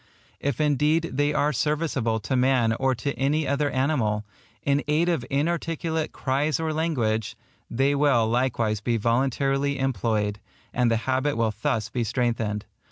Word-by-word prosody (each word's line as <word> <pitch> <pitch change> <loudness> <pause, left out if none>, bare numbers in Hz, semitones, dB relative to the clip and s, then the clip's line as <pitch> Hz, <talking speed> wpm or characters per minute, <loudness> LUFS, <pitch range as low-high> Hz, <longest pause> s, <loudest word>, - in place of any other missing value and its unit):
If 140 -4 -2
indeed 150 +3 +2
they 145 +2 +1
are 150 0 +1
serviceable 135 -4 0
to 130 - -2
man 125 -3 +3
or 130 +2 +1
to 140 +4 -3
any 145 +2 +1
other 145 +1 +1
animal, 130 -7 0 0.4
in 140 +1 +1
aid 155 +3 +2
of 165 -8 0
inarticulate 160 +1 -1
cries 145 +4 0
or 160 -1 -1
language, 120 -10 -1 0.3
they 135 +4 +2
will 140 -6 +3
likewise 115 -3 0
be 115 +1 0
voluntarily 135 +4 +1
employed, 110 -5 0 0.3
and 125 -1 +2
the 115 - +2
habit 130 +1 0
will 115 -2 +1
thus 115 -5 0
be 120 +2 -1
strengthened. 115 -3 -1
135 Hz, 150 wpm, -25 LUFS, 115-150 Hz, 0.4 s, man